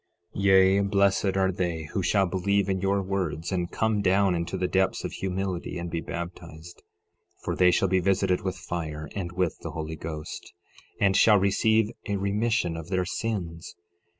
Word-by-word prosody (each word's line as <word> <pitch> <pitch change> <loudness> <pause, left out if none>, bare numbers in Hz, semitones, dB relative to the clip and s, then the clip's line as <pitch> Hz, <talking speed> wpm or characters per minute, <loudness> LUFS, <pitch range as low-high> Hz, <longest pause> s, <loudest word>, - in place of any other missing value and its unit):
Yea, 95 0 +5
blessed 100 -1 +2
are 95 -1 +2
they 85 -3 -2
who 95 - 0
shall 95 +2 +2
believe 95 +2 0
in 95 -1 -1
your 100 0 +1
words, 90 -4 -2
and 90 -2 -1
come 110 -2 0
down 95 0 +3
into 85 -1 -2
the 90 - 0
depths 95 +1 +1
of - - -3
humility 95 -2 -3
and 85 -1 -5
be 85 0 -2
baptized, 85 -1 -8 0.6
for - - -2
they 90 -1 +5
shall 95 +2 +2
be 95 0 +2
visited 90 -1 +1
with 95 -1 -3
fire 80 -3 -5
and 90 -3 -3
with 90 -2 -1
the - - -6
Holy 80 0 -5
Ghost, 75 0 -7 0.5
and 95 -1 +3
shall 105 0 +6
receive 110 +3 +2 0.2
a 100 - -1
remission 100 -2 0
of 80 0 -7
their 95 -1 0
sins. 90 -5 -4
95 Hz, 175 wpm, -26 LUFS, 85-100 Hz, 0.6 s, shall